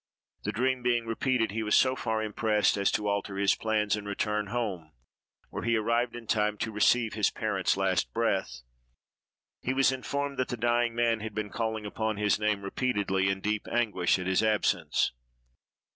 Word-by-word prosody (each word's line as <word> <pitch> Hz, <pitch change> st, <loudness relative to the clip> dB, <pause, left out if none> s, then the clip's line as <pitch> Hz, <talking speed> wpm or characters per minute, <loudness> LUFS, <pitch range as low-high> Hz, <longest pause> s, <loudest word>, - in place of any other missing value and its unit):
The -, -, 0 dB
dream 130 Hz, +2 st, 0 dB
being 120 Hz, -1 st, +1 dB
repeated, 115 Hz, 0 st, 0 dB
he 110 Hz, +2 st, -2 dB
was 105 Hz, -1 st, +2 dB
so 130 Hz, 0 st, +4 dB
far 110 Hz, -3 st, -1 dB
impressed 105 Hz, -1 st, +1 dB
as 100 Hz, -1 st, +1 dB
to 105 Hz, -1 st, 0 dB
alter 100 Hz, -1 st, -2 dB
his 100 Hz, 0 st, +3 dB
plans, 110 Hz, -2 st, 0 dB
and 105 Hz, -1 st, -7 dB
return 105 Hz, +1 st, -1 dB
home, 100 Hz, -9 st, -3 dB, 0.6 s
where -, -, -4 dB
he 115 Hz, 0 st, +1 dB
arrived 115 Hz, +2 st, 0 dB
in 120 Hz, -1 st, -8 dB
time 105 Hz, -1 st, +1 dB
to 110 Hz, -, -3 dB
receive 110 Hz, +2 st, +2 dB
his 105 Hz, -1 st, +2 dB
parent's 100 Hz, -4 st, -1 dB
last 95 Hz, -2 st, +1 dB
breath. 95 Hz, -, -1 dB, 1.0 s
He 130 Hz, -, -1 dB
was 135 Hz, 0 st, +4 dB
informed 140 Hz, +1 st, -3 dB
that 130 Hz, -, +1 dB
the 125 Hz, -, -4 dB
dying 120 Hz, 0 st, +1 dB
man 120 Hz, -1 st, +2 dB
had 110 Hz, -1 st, -6 dB
been 105 Hz, -1 st, -3 dB
calling 110 Hz, -2 st, -2 dB
upon 110 Hz, +1 st, -2 dB
his 105 Hz, 0 st, +2 dB
name 105 Hz, -2 st, 0 dB
repeatedly, 100 Hz, -3 st, 0 dB
in 95 Hz, 0 st, -2 dB
deep 105 Hz, +1 st, -2 dB
anguish 105 Hz, -8 st, +2 dB
at 90 Hz, -, -5 dB
his 95 Hz, 0 st, +2 dB
absence. 110 Hz, -1 st, +1 dB
110 Hz, 180 wpm, -29 LUFS, 100-120 Hz, 1.0 s, so